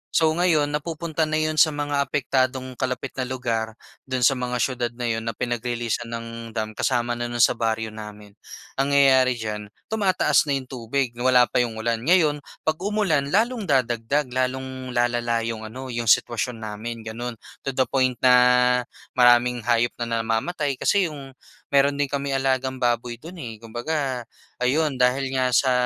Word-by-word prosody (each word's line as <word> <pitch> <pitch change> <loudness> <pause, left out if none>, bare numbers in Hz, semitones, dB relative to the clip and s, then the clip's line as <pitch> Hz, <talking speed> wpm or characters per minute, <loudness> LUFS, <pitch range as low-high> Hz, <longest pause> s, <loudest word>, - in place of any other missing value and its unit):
So 160 -1 +4
ngayon, 160 -3 +2
napupunta 160 +1 -2
na 155 - -1
yun 155 0 0
sa 155 -3 +5
mga 145 -1 -1
apektadong 130 -2 -1
kalapit 130 +1 -2
na 130 - -1
lugar, 115 -4 -2 0.3
dun 130 -1 -1
sa 120 - +6
mga 125 -2 -2
siyudad 125 -2 -1
na 120 -1 -2
yun 115 - -1
na 115 - -2
pinag-releasan 120 -1 -2
ng 115 0 -5 0.3
dam 110 -1 -2
kasama 120 +1 -1
na 120 - -2
nun 120 -1 +1
sa - - +6
baryo 115 -2 -1
namin. 105 -1 -10 0.5
Nangyayari 135 -2 +4
diyan, 105 -2 -5 0.2
tumataas 195 -7 +2
na 140 - +1
yung 130 -1 -5
tubig, 125 +1 -2
wala 125 0 +5
pa - - +2
yung 120 -2 0
ulan. 115 +1 -1
Ngayon, 160 -5 +4 0.2
'pag 155 0 0
umulan, 195 -8 +1
lalong 220 - +1
dadagdag, 130 0 +1
lalong 130 0 -3
lalala 120 -1 +1
yung 110 -1 -4
ano, 130 +3 -7
yung 120 -1 -3
sitwasyon 115 +1 +2
namin, 110 +2 -6
gano'n. 115 +2 -5 0.3
To 135 - -2
the 130 - +4
point 130 -1 +1
na 130 - +7 0.9
maraming 120 -1 +4
hayop 120 0 +3
na 115 -1 -1
namamatay 135 +5 -1
kasi 195 -5 +2
yung 135 -3 -10 0.4
mayro'n 140 +1 +3
din 145 - +2
kaming 140 0 -1
alagang 130 -1 0
baboy 120 -1 -1
do'n 165 +7 -10
eh. 115 -10 -8
Kumbaga, 125 +3 -3 0.4
ayun, 145 +3 +1
dahil 130 +2 +2
nga 130 -1 +1
sa 130 +1 +3
125 Hz, 165 wpm, -24 LUFS, 120-140 Hz, 0.9 s, na